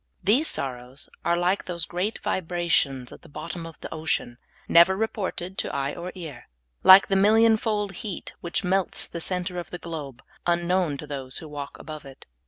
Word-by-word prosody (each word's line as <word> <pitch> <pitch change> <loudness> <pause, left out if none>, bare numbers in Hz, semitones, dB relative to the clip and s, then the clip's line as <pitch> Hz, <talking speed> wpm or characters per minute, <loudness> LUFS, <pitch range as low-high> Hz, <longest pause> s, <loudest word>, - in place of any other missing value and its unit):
These 250 +11 +4
sorrows 125 0 -3
are 170 +1 +2
like 180 +3 +1
those 170 -2 -3
great 185 +5 -2
vibrations 165 -7 0
at - - -12
the - - -16
bot 165 - -6
tom 170 -2 -6
of 165 - -12
the - - -6
ocean 155 -6 -2
— - - -30
never 170 +3 +6
reported 195 -4 -3
to - - -1
eye 140 +1 -1
or 180 +2 -6
ear; 155 -9 -9 0.3
like 190 +1 +10
the 195 - +1
million 220 +3 +6
fold 210 -2 -1
heat 205 -5 -5
which 170 +3 -1
melts 190 +1 +1
the 170 - -6
center 180 0 -2
of 175 - -7
the 175 - -5
globe, 150 -7 -7 0.2
unknown 175 -2 +1
to 150 - -7
those 135 -3 -4
who 160 - -6
walk 145 -1 -7
above 155 -1 -8
it. 135 -1 -13
175 Hz, 190 wpm, -26 LUFS, 150-190 Hz, 0.3 s, like